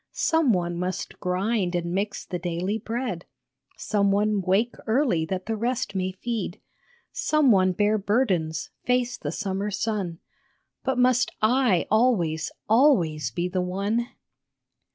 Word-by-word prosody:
Some 320 -6 +2
one 175 -3 -1
must 180 0 -4
grind 185 0 0
and 170 0 -2
mix 200 +2 -2
the 180 - -4
daily 180 +5 -2
bread, 225 -5 -3 0.5
Some 200 -2 +1
one 205 0 +2
wake 195 +6 +1
early 220 - +2
that 185 +1 -3
the 225 - -2
rest 245 +1 -2
may 185 -1 -1
feed, 210 -1 -4 0.5
Some 305 - +3
one 185 -2 +4
bear 210 +3 +2
burdens, 195 -7 0
face 250 0 +1
the 145 - -5
summer 195 +2 -2
sun 195 -4 -2 0.7
But 265 -1 0
must 250 0 +3
I 225 -4 +3
always, 180 -10 +2 0.2
always 210 - +3
be 175 0 -2
the 180 0 -1
one 200 +6 -1
200 Hz, 135 wpm, -25 LUFS, 180-235 Hz, 0.7 s, one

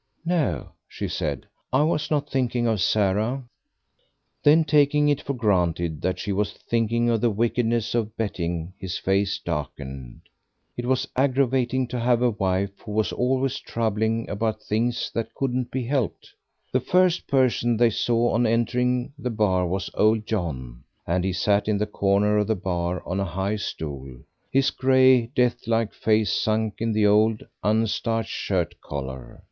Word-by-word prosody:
"No," 155 - 0 0.2
she - - -4
said, - - -3 0.3
"I 130 +4 +3
was 150 -1 0
not 145 -1 0
thinking 125 -3 0
of 110 -4 +1
Sarah." 105 +7 +1 1.0
Then, 155 +2 +5
taking 150 -1 +3
it 145 - +1
for 140 - -3
granted 85 -8 0
that 95 - -1
she 105 - -3
was 105 +1 -1
thinking 115 0 0
of 115 -2 +1
the 120 - +3
wickedness 115 +1 0
of 110 -2 -2
betting, 85 -5 -3
his 95 -2 -4
face 100 +1 +1
darkened. 70 -5 -6 0.5
It 120 0 -4
was 130 -1 +1
aggravating 130 -1 +1
to 125 - -3
have 120 0 +2
a 125 - +3
wife 100 -1 -1
who 105 - -8
was 110 0 +1
always 130 +1 0
troubling 110 0 -1
about 110 +1 -2
things 115 +3 -1
that 115 - -3
couldn't 130 -2 -1
be 130 -1 -2
helped. 130 -2 -2 0.4
The - - +2
first 180 -1 +2
person 125 -3 +2
they 120 0 +4
saw 120 +2 +1
on 120 +1 +2
entering 125 +3 0
the 125 - -2
bar 100 -5 +1
was 95 +2 -3
old 110 0 +2
John; 70 - -4 0.2
and 90 +1 0
he 95 - 0
sat 100 +3 +1
in 105 -1 +2
the 105 - 0
corner 105 0 +2
of 105 - 0
the 110 - +1
bar 90 -1 -2
on 90 +3 -2
a - - +1
high 95 +4 -2
stool, 70 -9 -5 0.4
his 135 0 +3
grey, 130 -2 +4
death 120 -2 +1
like 115 -2 +1
face 110 -3 +1
sunk 110 -1 0
in 115 0 0
the 105 -1 +2
old 105 +1 +3 0.2
unstarched 110 +1 0
shirt 90 -5 -1
collar. 65 -2 -7
110 Hz, 165 wpm, -24 LUFS, 95-125 Hz, 1.0 s, Then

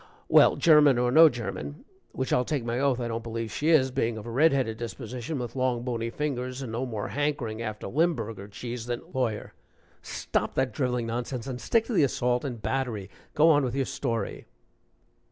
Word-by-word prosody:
Well, - - +6
German 150 -5 +6
or 125 0 +2
no 160 +4 +8
German, 120 - -6 0.3
which 130 - -2
I'll 125 - +3
take 135 -2 -2
my 120 +1 -1
oath 135 -2 +2
I 120 - -2
don't 115 0 -3
believe 115 -1 -4
she 150 +8 -1
is, 135 -5 +4
being 115 -2 -1
of 110 - -8
a 120 - -6
red 150 +7 +4
headed 125 -5 0
disposition, 120 +5 -5
with 120 -1 -5
long, 130 -2 0
bony 115 -2 -2
fingers, 130 -1 -3
and 120 - -6
no 120 +4 -2
more 110 -4 -4
hankering 140 -6 -2
after 110 -2 -5
Limberger 115 - -1
cheese 120 +3 -6
than 120 -1 -3
" - - -20
LAWYER. 120 -5 -2 0.5
"Stop - - -2
that 130 -1 0
driveling 125 -4 -1
nonsense 120 +1 -3
and 125 -2 -5
stick 230 -1 +2
to 245 - -4
the 190 - +4
assault 125 -3 +1
and 125 -5 -4
battery. 115 -7 -2 0.2
Go 155 +2 +6
on 145 -2 +4
with 125 -1 -2
your 135 -1 +1
story." 115 -7 -3
125 Hz, 200 wpm, -27 LUFS, 115-140 Hz, 0.5 s, no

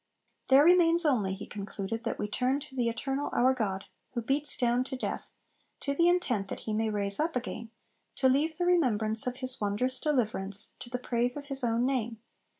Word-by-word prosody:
There 270 +2 +7
remains 340 0 +5
only, 210 -10 +1
he 205 - -8
concluded, 205 +2 -5
'that 230 - -2
we 210 - -2
turn 255 +6 0
to 280 -2 -11
the 240 -2 +1
Eternal 270 +5 -3
our 255 +2 +4
God, 195 -6 -2 0.3
who 235 - -2
beats 280 +5 +2
down 245 0 +2
to 265 - -5
death, 255 - -4 0.5
to 280 - -1
the 340 +4 +4
intent 250 - +1
that - - -6
he 215 - -4
may 220 +1 0
raise 200 -1 -1
up 320 0 0
again, 235 -2 -4 0.5
to 265 - +2
leave 300 +5 +1
the 355 - 0
remembrance 225 -11 +1
of 250 0 -3
his 255 -1 0
wondrous 210 +6 0
deliverance, 215 -9 -1
to 240 - -9
the 250 - -2
praise 245 +1 0
of 285 - -7
his 275 -1 +1
own 235 +1 +1
name 240 -4 -1
250 Hz, 200 wpm, -29 LUFS, 220-280 Hz, 0.5 s, There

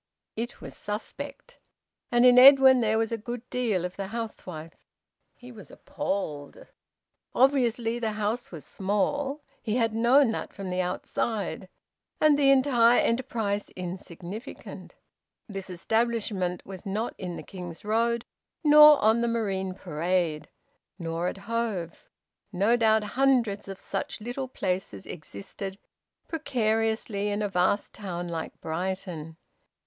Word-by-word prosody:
It 235 +2 -5
was - - -9
suspect. 210 +1 -7 0.5
And 240 +1 +5
in 250 0 +8
Edwin 265 -1 +8
there 220 -1 +2
was 225 0 0
a 230 - -2
good 240 +2 -6
deal 220 -8 0
of 180 - -6
the 195 -1 -3
housewife. 185 -7 -7 0.5
He 245 0 -13
was 215 -5 -12
appalled. 150 -8 -4 0.7
Obviously 240 -3 +2
the 220 -2 -1
house 215 +3 -2
was 160 -5 -9
small 270 +9 -1 0.2
he 220 -1 -2
had 230 -3 +1
known 240 +3 +4
that - - -5
from 195 -2 -6
the 180 0 0
outside 185 0 -3 0.5
and 305 -1 +5
the 280 -1 +4
entire 255 -3 +5
enterprise 225 -4 -1
insignificant. 185 - -8 0.5
This 195 -3 -7
establishment 205 -1 -1
was 190 -2 -9
not 215 +3 -2
in 180 -2 -5
the - - -7
King's 180 -2 -9
Road, 230 +2 +1 0.4
nor 300 -1 +9
on 220 +2 +4
the 235 - +1
Marine 195 -5 -1
Parade, 170 -2 -1 0.5
nor 165 -1 -2
at 180 - -3
Hove; 200 -5 -4 0.4
no 205 +5 +3
doubt 220 -2 +3
hundreds 240 -4 +1
of 195 -1 -7
such 280 -3 -4
little 245 +4 -4
places 185 - -3
existed 180 - -8 0.5
precariously 225 -8 -1
in 205 +1 -1
a 205 - -1
vast 185 +2 +1
town 175 -4 -5
like 165 -2 -5
Brighton. 165 -1 -4
215 Hz, 130 wpm, -27 LUFS, 185-235 Hz, 0.7 s, nor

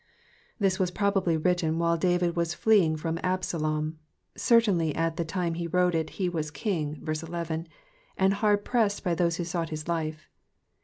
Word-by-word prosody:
— - - -33
This 195 -2 +1
voas 185 -2 +1
probably 195 -4 +1
torUten 165 -1 +1
while 170 0 +2
David 175 0 +1
xdos 170 0 -1
fleeing 195 -8 +4
frotn 165 +1 -3
Absalom; 155 -4 -1 0.4
ceriairdy 195 -10 +3
at 165 0 0
the 170 - 0
time 170 0 -2
he 170 0 -4
torote 180 0 +2
it 160 -1 0
he 185 - 0
was 160 -3 -2
king 155 -4 -2
{verse 155 0 -2
11), 165 0 -4 0.5
and 190 +1 +3
hard 205 0 +1
pressed 220 -5 +1
by 180 -4 +1
those 170 0 +1
who 175 - -2
sought 170 -1 -2
his 155 0 -6
life. 155 -2 -3
170 Hz, 175 wpm, -27 LUFS, 160-185 Hz, 0.5 s, fleeing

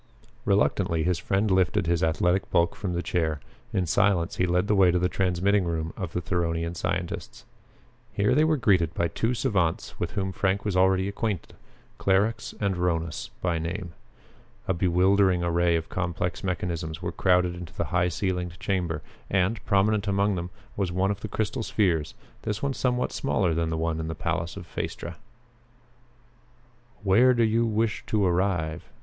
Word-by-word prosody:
Reluctantly 80 -1 +2
his 90 0 +1
friend 100 +3 0
lifted 90 -3 +2
his 85 0 +1
athletic 90 +4 +1
bulk 85 0 +2
from 95 -4 -3
the 85 +1 -2
chair. 80 -4 0 0.3
In 95 - 0
silence 95 0 +2
he 90 - +2
led 90 +2 +2
the 105 - +1
way 95 -3 +5
to 90 - +2
the 90 +1 +2
transmitting 95 +2 +1
room 80 -1 -2
of 90 -4 -5
the 90 - -1
Theronian 85 -2 -1
scientists. 85 +1 -4 0.7
Here 105 +5 +2
they 150 +4 +4
were 155 -1 +3
greeted 90 - +2
by 85 - +1
two 115 +2 -1
savants 100 -10 -1
with - - -2
whom 95 -2 -1
Frank 95 +1 0
was 105 -3 -1
already 95 +1 +3
acquainted, 100 -2 -3 0.5
Clarux 100 +4 +1
and 100 -3 0
Rhonus 85 -4 -1
by 85 -2 +1
name. 85 +1 -4 0.7
A 95 - +2
bewildering 90 +1 +3
array 85 0 +2
of 80 0 -2
complex 90 -1 -3
mechanisms 85 -3 -3
was - - -3
crowded 90 -1 +3
into 90 -2 -9
the - - -2
high 90 0 +3
ceilinged 90 -1 -2
chamber 85 -6 -1 0.3
and, 95 +3 +1
prominent 100 0 +2
among 100 +1 +2
them, 90 -1 -3 0.3
was 95 -3 -1
one 95 +3 +1
of 100 - -4
the - - -5
crystal 110 +2 -2
spheres, 90 -9 0 0.3
this 105 +3 -3
one 140 - +1
of - - -5
somewhat 125 -1 0
smaller 105 -9 0
size 80 - -1
than 85 -1 0
the 80 - -2
one 80 0 -1
in 80 - -3
the 80 - -4
palace 80 +2 -2
of - - -7
Phaestra. 85 - -5 1.9
"Where 120 +6 +5
do 120 - +3
you 115 +1 +2
wish 110 -1 0
to 105 -2 +2
arrive?" 90 -3 0
90 Hz, 175 wpm, -26 LUFS, 85-100 Hz, 1.9 s, way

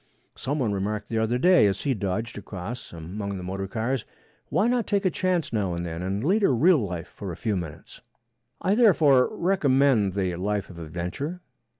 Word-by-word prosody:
Some 140 +4 -2
one 120 -7 0
remarked 100 +1 -2
the 115 - 0
other 110 +2 +1
day 175 - +5
as 95 - -1
he 140 - +1
dodged 105 +2 -3
across 100 +4 -7
among 95 +5 -5
the 90 - -6
motor 95 +2 -4
cars, 115 +4 -2 0.5
'Why 215 - +2
not 240 -2 +1
take 200 -1 +1
a 185 - +3
chance 180 -8 0
now 100 -5 0
and 85 0 -3
then 85 0 -5
and 95 +4 -2
lead 195 +9 +2
a 200 - +4
real 155 +6 +5
life 90 -5 -4
for 100 -3 -7
a 85 - -7
few 110 -3 -1
minutes?' 80 -5 -7 0.6
I 190 - +1
therefore 160 - +5
recommend 140 - +2
the 95 -3 -1
life 100 +1 -2
of 85 - -11
adventure. 90 - -5
110 Hz, 195 wpm, -26 LUFS, 95-145 Hz, 0.6 s, day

